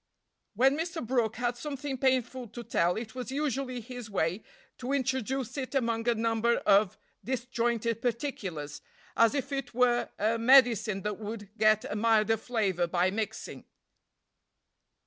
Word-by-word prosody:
"When 265 +5 +4
Mr. 325 -2 -3
Brooke 230 -3 0
had 240 0 -1
something 280 0 -4
painful 260 -1 0
to 235 +3 -8
tell 175 -6 +1
it 220 0 -6
was 255 0 -6
usually 270 -3 -2
his 245 -1 -8
way 180 0 -1 0.4
to 255 +2 -3
introduce 265 0 -1
it 265 +1 -5
among 230 -2 +1
a 235 - +3
number 230 +1 +1
of 200 -1 +4 0.3
disjointed 235 -2 -1
particulars, 185 - -3 0.3
as 230 +3 +4
if 275 -1 -2
it 275 -3 -4
were 245 -1 +2
a 225 +2 +1
medicine 230 -5 +5
that 210 -1 -3
would 210 -1 -7
get 215 -1 +3
a - - -4
milder 225 0 +3
flavor 200 -7 0
by 180 +2 +1
mixing." 215 +1 -5
235 Hz, 145 wpm, -29 LUFS, 215-255 Hz, 0.4 s, medicine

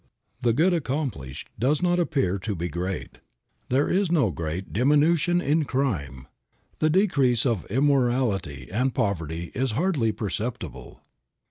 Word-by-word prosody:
The 120 -2 +3
good 165 +10 +3
accomplished 130 - -3
does 135 +6 +2
not 175 0 +2
appear 135 - 0
to 105 +1 -3
be 85 +1 -3
great. 90 +3 -4 0.5
There 135 +4 +2
is 190 -2 +1
no 140 - +3
great 85 +3 -5
diminution 150 - +3
in 155 +2 +2
crime. 85 - -2 0.5
The 155 - +3
decrease 140 - +3
of 115 -8 -1
immorality 120 - +1
and 125 +5 0
poverty 85 - -2
is 130 -2 -1
hardly 140 - +1
perceptible. 110 +3 -5
125 Hz, 130 wpm, -25 LUFS, 95-150 Hz, 0.5 s, The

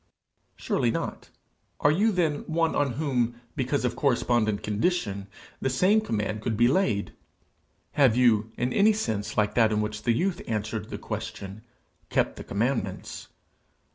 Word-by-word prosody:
Surely - - 0
not! - - -4 0.5
Are 145 - +4
you 205 +8 +3
then 165 -6 +1
one 165 0 +1
on 140 -3 +1
whom, 120 -4 -1 0.2
because 130 +1 0
of 125 - -1
correspondent 120 -6 +1
condition, 105 - -1 0.3
the - - +1
same 185 +12 +3
command 105 - -2
could 110 -1 -2
be 120 +1 +5
laid? 125 - +1 0.8
Have 130 -5 +4
you, 115 -3 +3
in 125 +1 -1
any 215 +2 +5
sense 110 - -3
like 105 -1 +2
that 115 -2 +4
in 105 - +1
which 105 0 -3
the 120 - +1
youth 180 +9 0
answered 110 -1 -3
the - - -5
question, 100 +2 -6 0.5
kept - - 0
the - - -7
commandments? 120 +6 -2
120 Hz, 150 wpm, -27 LUFS, 105-150 Hz, 0.8 s, be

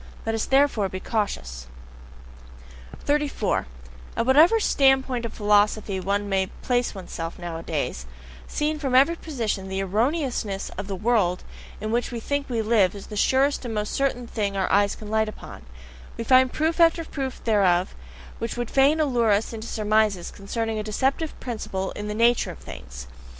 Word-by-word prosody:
Let 225 - -1
us 225 - -1
therefore 270 -8 +3
be 185 - -5
cautious! 65 - -3 1.4
34. 290 - 0 0.5
At 230 - +1
whatever 315 - +6
standpoint 265 - +2
of 230 - -5
philosophy 205 -1 +2
one 200 +2 -1
may 190 -1 +1 0.2
place 245 -3 0
oneself 170 -3 -6
nowadays, 165 - -4 0.4
seen 300 +1 -1
from 270 -4 -1
every 280 +6 +5
position, 230 - -3
the 190 0 -3
ERRONEOUSNESS 225 - -1
of 200 - -6
the 195 - -3
world 205 -4 +1 0.4
in 215 - -3
which 240 +2 0
we 235 - -4
think 285 +4 -2
we 230 -3 -1
live 210 -4 +3
is 200 - -8
the - - -4
surest 270 +7 +2
and 235 -3 -4
most 210 0 -2
certain 265 -3 0
thing 205 -4 -2
our 190 - 0
eyes 200 0 +3
can 215 - -10
light 220 0 +2
upon: - - -11 0.5
we - - -3
find 255 +1 +5
proof 320 +2 0
after 330 0 +4
proof 270 -4 -5
thereof, 190 -5 +2 0.5
which 230 +1 -4
would 240 -1 -3
fain 280 +4 +4
allure 245 -7 +2
us 205 +3 +1
into 225 0 -6
surmises 215 -4 +1
concerning 220 +2 -3
a - - -3
deceptive 265 +8 -1
principle 195 -5 -4
in 210 - -6
the 210 - -3
"nature 235 +2 +3
of - - -8
things." 60 0 -10
225 Hz, 165 wpm, -24 LUFS, 200-265 Hz, 1.4 s, whatever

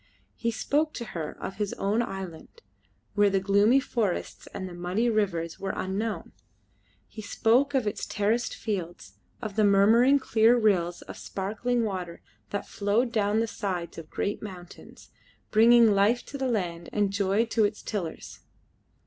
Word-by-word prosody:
He 230 - -1
spoke 295 +7 0
to 235 - -5
her 160 -3 -5
of - - -6
his 205 -1 -2
own 205 +4 0
island, 195 - -7 0.5
where 205 0 +4
the 195 0 +2
gloomy 200 +6 +4
forests 225 -8 -2
and 190 -2 -6
the 180 - -9
muddy 180 +7 0
rivers 170 -6 -1
were 195 - -3
unknown. 205 +4 -3 0.8
He 220 - -9
spoke 245 +7 +2
of 260 -4 +2
its 210 - -3
terraced 220 +3 0
fields, 175 - -5 0.3
of 215 -3 -5
the 215 - +3
murmuring 220 +7 +5
clear 235 -3 +4
rills 180 -6 +1
of - - -10
sparkling 220 +5 -2
water 185 -5 -4 0.3
that 200 - -3
flowed 215 +4 0
down 215 0 +1
the - - +1
sides 185 -6 -4
of 160 - -11
great 205 - -2
mountains, 185 -4 -11 0.4
bringing 230 +1 +6
life 205 +5 +2
to 280 - -7
the 265 - 0
land 175 -8 -2
and 205 -2 0
joy 200 +3 +2
to 225 -1 +1
its 210 0 -1
tillers. 180 -7 -5
205 Hz, 155 wpm, -27 LUFS, 190-230 Hz, 0.8 s, bringing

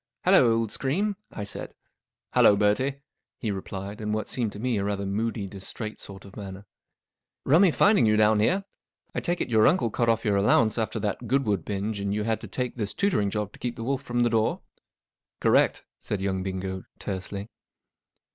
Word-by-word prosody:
'Hallo, 120 - +6
old 115 -2 0
scream," 190 - 0 0.2
I 105 - -5
said. 100 - -5
<§ - - -29 0.6
Hallo, 105 - +6
Bertie," 130 +7 +1 0.3
he 110 - -2
replied, 100 +2 -6
in 105 0 -2
what 110 0 -2
seemed 115 -5 -1
to 105 - -8
me 120 -2 0
rather 100 0 -1
a - - -3
moody, 105 +2 -2
distrait 100 +3 -6
sort 100 0 -10
of 100 - -13
manner. 95 -2 -7
'• - - -20 0.8
Rummy 175 +7 +6
finding 200 - +4
you 105 0 +3
down 110 0 +4
here. 185 - +2 0.5
I - - -1
take 175 0 -1
it - - -2
your 110 -1 +5
uncle 150 -9 +2
cut 120 +1 +1
off 115 +1 +1
your 100 -2 +2
allowance 110 +3 +3
after 110 0 -1
that 105 +3 -3
Goodwood 110 -8 +1
binge 100 +1 -3
and 100 0 -1
you 105 - -1
had 110 0 -1
to - - -7
take 125 -1 -3
this 105 -3 -3
tutoring 140 - +1
job 105 0 -3
to - - -15
keep 120 -1 -3
the 115 - -6
wolf 135 +2 -1
from 120 -3 -1
the 120 -1 +3
door? 110 -1 +1 0.3
" - - -66
" - - -67
Correct," - - +3
said 105 - -3
young 95 -1 -1
Bingo, 95 0 -4
tersely. 100 +1 -5
110 Hz, 205 wpm, -26 LUFS, 100-120 Hz, 0.8 s, Hallo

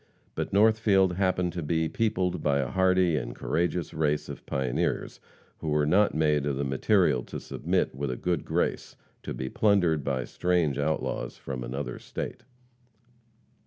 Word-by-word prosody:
But - - -3
Northfield 100 -3 +4
happened 90 -1 0
to 90 - -3
be 80 +1 0
peopled 95 -3 0
by 70 -1 +2
a 65 -3 -1
hardy 95 -2 +3
and - - -4
courageous 85 0 -1
race 75 -1 0
of - - -8
pioneers 65 -3 -1 0.4
who 80 - -3
were 75 0 +2
not 100 +7 +3
made 75 -2 +2
of 70 - 0
the 70 - -2
material 65 -2 +2
to - - -6
submit - - -1
with 70 +1 -3
a 65 - -2
good 90 -1 -1
grace - - -1 0.3
to - - -6
be 65 - -4
plundered 90 -4 +2
by 65 -2 -1
strange 85 -6 0
outlaws 80 +2 -2
from 65 -2 -5
another 65 +4 -4
state. - - -6
80 Hz, 160 wpm, -27 LUFS, 70-90 Hz, 0.4 s, Northfield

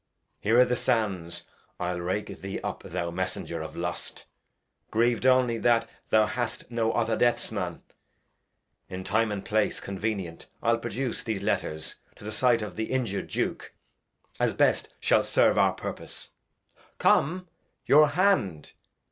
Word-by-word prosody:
Here 115 +4 +3
i' 125 - +8
th' 125 0 0
Sands 100 -9 0 0.4
I'll 90 0 -2
rake 100 +4 -3
thee 95 0 -4
up, - - -4
thou 85 0 -4
Messenger 90 +2 -3
of - - -7
Lust, 85 0 -4 0.6
Griev'd 120 +2 +2
only 125 -3 +4
that 115 -1 +3 0.2
thou 110 -1 +5
hadst 120 +1 -3
no 115 -1 +1
other 115 -1 +1
Deaths 120 +1 +2
Man. - - -4 1.1
In 95 0 -5
Time 110 +3 +1
and 100 -2 -4
Place 110 0 +1
convenient 100 -4 -4 0.2
I'll 115 0 +3
produce 120 +1 -3
These 110 -4 -3
Letters 90 -6 -1 0.2
to - - -15
the 105 - -4
Sight 115 0 +3
of 105 - -7
th' 110 - -2
injur'd 120 -7 -1
Duke, - - -3 0.7
As - - +1
best - - +2
shall - - +4
serve - - +3
our - - +4
Purpose; - - -5 0.7
come, 180 +5 +2 0.4
your 150 +1 +7
Hand. 145 - +1
110 Hz, 145 wpm, -27 LUFS, 95-120 Hz, 1.1 s, i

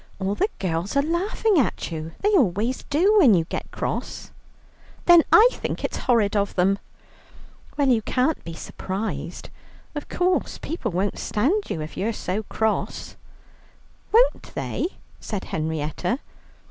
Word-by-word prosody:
All 195 +1 -1
the 400 - +1
girls 185 +6 -2
are 280 - +4
laughing 370 +4 +1
at 245 - -1
you; 160 0 -5
they 415 - +3
always 235 - +2
do 385 +9 +4
when 255 - +7
you 165 -2 +1
get - - -5
cross." - - -4 0.7
"Then 345 -1 +8
I 445 +2 +9
think - - -4
it's - - -2
horrid 220 -4 +3
of 200 -1 0
them." 195 +2 +2 1.0
"Well, 285 -2 +2
you 235 -3 +4
can't 255 +8 0
be 165 - -7
surprised; 195 +6 -5 0.4
of 295 -1 -6
course 360 +1 0
people 315 -8 -4
won't 195 +2 -1
stand 320 - 0
you, 155 - -2
if 155 - -8
you're 225 +4 0
so 200 0 -2
cross." 220 +1 -2 1.0
"Won't - - +3
they?" - - -2 0.3
said 205 -4 -4
Henrietta. 160 - -2
225 Hz, 145 wpm, -24 LUFS, -, 1.0 s, I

